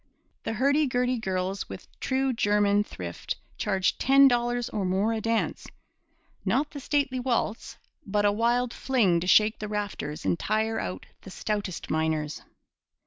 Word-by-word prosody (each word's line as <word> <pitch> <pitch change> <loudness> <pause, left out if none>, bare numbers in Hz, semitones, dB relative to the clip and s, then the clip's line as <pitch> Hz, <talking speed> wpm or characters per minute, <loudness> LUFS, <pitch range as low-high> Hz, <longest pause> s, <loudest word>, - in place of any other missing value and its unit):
The - - -1
hurdy 280 +6 +2
gurdy 250 0 0
girls 190 -1 -2
with - - -9
true 265 0 0
German 205 -2 +3
thrift 90 - -6 0.2
charged 190 -2 0
ten 275 +1 +6
dollars 240 -1 +1
or 210 - -3
more 190 +4 +1
a 220 - -2
dance 225 +1 -1 0.8
not 290 +2 +1
the 285 - -7
stately 275 -2 0
waltz, 240 -3 -2 0.3
but 205 +1 0
a 205 - +5
wild 235 +3 +1
fling 215 -10 +2
to 175 - -4
shake 215 +3 +5
the 210 - -4
rafters 205 -8 -4
and 170 - +1
tire 220 +1 0
out 90 0 -5 0.2
the - - -11
stoutest 200 -1 -3
miners. 155 -1 -1
215 Hz, 150 wpm, -27 LUFS, 190-245 Hz, 0.8 s, ten